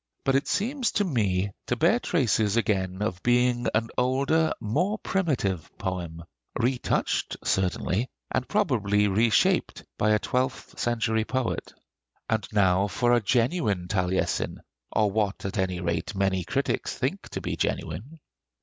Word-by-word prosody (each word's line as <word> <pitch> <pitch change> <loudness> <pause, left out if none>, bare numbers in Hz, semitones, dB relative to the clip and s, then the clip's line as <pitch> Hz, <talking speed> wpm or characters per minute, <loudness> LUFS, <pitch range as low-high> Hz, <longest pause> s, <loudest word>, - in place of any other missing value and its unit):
But 135 - +2
it 135 +1 +2
seems 245 +5 0
to 205 - +2
me 100 - 0 0.2
to 120 - +1
bear 170 - +3
traces 115 - +1
again 95 -4 0
of 95 -4 -2
being 120 0 +2
an 115 +1 +1
older, 140 +6 +2
more 165 - 0
primitive 135 - -1
poem, 85 -3 -4 0.4
retouched 125 +1 0
certainly, 95 +4 0 0.2
and 130 - -1
probably 105 - +2
reshaped, 110 +3 +2 0.2
by 105 - +3
a - - +5
twelfth 125 +4 -2
century 110 -2 +1
poet. 130 0 -2 0.6
And 110 -2 0
now 100 -1 +3
for 120 +5 +2
a 120 - +4
genuine 115 - +1
Taliesin, 90 -1 -1 0.3
or 105 -2 +2
what 100 -2 -1
at 95 +1 -2
any 95 -1 0
rate 85 +2 -2
many 95 -2 +1
critics - - -1
think - - -2
to - - -4
be - - -3
genuine. 110 - -3
110 Hz, 140 wpm, -26 LUFS, 95-130 Hz, 0.6 s, a